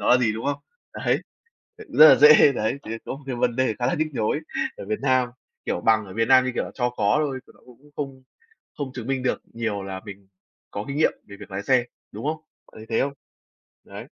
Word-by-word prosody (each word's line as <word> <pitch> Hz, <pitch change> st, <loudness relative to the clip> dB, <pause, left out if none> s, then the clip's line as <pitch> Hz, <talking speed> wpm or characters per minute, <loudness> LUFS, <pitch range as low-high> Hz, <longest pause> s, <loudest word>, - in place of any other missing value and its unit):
nó -, -, -1 dB
là 125 Hz, -, +7 dB
gì, 120 Hz, -4 st, +1 dB
đúng 110 Hz, -, -6 dB
không? 145 Hz, 0 st, -1 dB, 0.3 s
Đấy, -, -, 0 dB, 0.5 s
ờ, 440 Hz, -, -11 dB
rất 155 Hz, -, +8 dB
là -, -, +9 dB
dễ, 150 Hz, 0 st, +8 dB
đấy. 110 Hz, +2 st, -1 dB
Thì 110 Hz, -, -9 dB
có -, -, -5 dB
một 145 Hz, -, -14 dB
cái 130 Hz, -3 st, -3 dB
vấn 120 Hz, -1 st, 0 dB
đề 130 Hz, -4 st, +1 dB
khá 120 Hz, -, 0 dB
là -, -, +1 dB
nhức 155 Hz, -, 0 dB
nhối 115 Hz, +4 st, 0 dB, 0.4 s
ở -, -, -8 dB
Việt 215 Hz, -1 st, -2 dB
Nam, 130 Hz, -2 st, +2 dB, 0.4 s
kiểu, -, -, -2 dB
bằng 110 Hz, +1 st, +2 dB
ở 95 Hz, -, -10 dB
Việt 115 Hz, +1 st, 0 dB
Nam 130 Hz, -1 st, +6 dB
như 130 Hz, -, -1 dB
kiểu -, -, -1 dB
là -, -, -8 dB
cho 125 Hz, -2 st, 0 dB
có 105 Hz, -3 st, +1 dB
thôi, 140 Hz, -4 st, -1 dB
thì -, -, -19 dB
nó -, -, -23 dB
cũng 130 Hz, +4 st, -19 dB
không 135 Hz, -2 st, -5 dB, 0.5 s
không 140 Hz, -3 st, -5 dB
chứng 125 Hz, -3 st, -7 dB
minh 135 Hz, -1 st, -1 dB
được 130 Hz, -, -1 dB
nhiều 110 Hz, -4 st, -3 dB
là 95 Hz, -1 st, -6 dB
mình 100 Hz, -2 st, -11 dB, 0.4 s
có 100 Hz, -, -5 dB
kinh 140 Hz, -, -4 dB
nghiệm 155 Hz, -, +3 dB
về 100 Hz, -1 st, -11 dB
việc -, -, -11 dB
lái 95 Hz, +1 st, -4 dB
xe, 125 Hz, +1 st, +3 dB, 0.3 s
đúng -, -, -6 dB
không? 155 Hz, +1 st, 0 dB, 0.4 s
Bạn -, -, -19 dB
thấy 110 Hz, -, -11 dB
thế 115 Hz, -, +1 dB
không? 140 Hz, -, -4 dB, 0.7 s
Đấy. -, -, -10 dB
125 Hz, 255 wpm, -24 LUFS, 110-140 Hz, 0.7 s, là